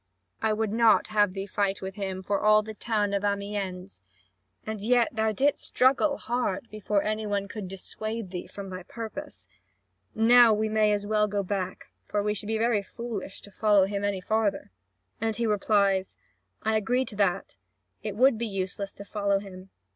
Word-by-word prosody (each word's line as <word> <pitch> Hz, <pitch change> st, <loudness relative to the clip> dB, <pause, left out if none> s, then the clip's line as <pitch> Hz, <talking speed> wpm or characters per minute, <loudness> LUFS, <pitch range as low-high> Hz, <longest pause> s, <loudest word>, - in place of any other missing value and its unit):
I 220 Hz, -, +2 dB
would 215 Hz, -1 st, 0 dB
not 225 Hz, -1 st, +4 dB
have 205 Hz, -3 st, +2 dB
thee 195 Hz, 0 st, -4 dB
fight 200 Hz, -1 st, -1 dB
with 190 Hz, 0 st, -4 dB
him 190 Hz, -2 st, -4 dB
for 200 Hz, +2 st, 0 dB
all 215 Hz, 0 st, +5 dB
the 220 Hz, +1 st, -7 dB
town 210 Hz, -2 st, -1 dB
of 200 Hz, 0 st, 0 dB
Amiens; 200 Hz, -, -3 dB, 0.6 s
and 220 Hz, -1 st, -4 dB
yet 235 Hz, +1 st, +3 dB
thou 220 Hz, 0 st, +1 dB
didst 275 Hz, +7 st, +1 dB
struggle 275 Hz, +3 st, +3 dB
hard, 245 Hz, +2 st, -2 dB
before 210 Hz, -1 st, 0 dB
any 215 Hz, 0 st, -2 dB
one 200 Hz, -1 st, -1 dB
could 205 Hz, -2 st, -6 dB
dissuade 215 Hz, +2 st, -5 dB
thee 180 Hz, -2 st, -5 dB
from 200 Hz, -1 st, -8 dB
thy 185 Hz, 0 st, -6 dB
purpose. 215 Hz, -, -8 dB, 0.7 s
Now 235 Hz, 0 st, +7 dB
we 215 Hz, +1 st, 0 dB
may 215 Hz, -1 st, +3 dB
as 205 Hz, 0 st, 0 dB
well 210 Hz, 0 st, +2 dB
go 200 Hz, -1 st, -1 dB
back, 190 Hz, -1 st, -4 dB
for 205 Hz, -1 st, -1 dB
we 210 Hz, 0 st, +1 dB
should 205 Hz, 0 st, -5 dB
be 220 Hz, 0 st, 0 dB
very 225 Hz, -2 st, +2 dB
foolish 220 Hz, -1 st, -7 dB
to 205 Hz, -, -12 dB
follow 205 Hz, -1 st, +4 dB
him 200 Hz, +1 st, -3 dB
any 200 Hz, -2 st, -1 dB
farther." 215 Hz, -, 0 dB, 0.5 s
And 225 Hz, -1 st, 0 dB
he 235 Hz, +2 st, -1 dB
replies: 200 Hz, -2 st, +2 dB, 0.5 s
"I 220 Hz, 0 st, +2 dB
agree 245 Hz, +5 st, +1 dB
to 215 Hz, -, -6 dB
that. 195 Hz, -2 st, 0 dB, 0.4 s
It 210 Hz, -2 st, -4 dB
would 250 Hz, 0 st, +4 dB
be 235 Hz, -, -1 dB
useless 195 Hz, 0 st, -4 dB
to 200 Hz, -, -10 dB
follow 200 Hz, -1 st, 0 dB
him. 195 Hz, -1 st, -9 dB
210 Hz, 185 wpm, -27 LUFS, 195-220 Hz, 0.7 s, Now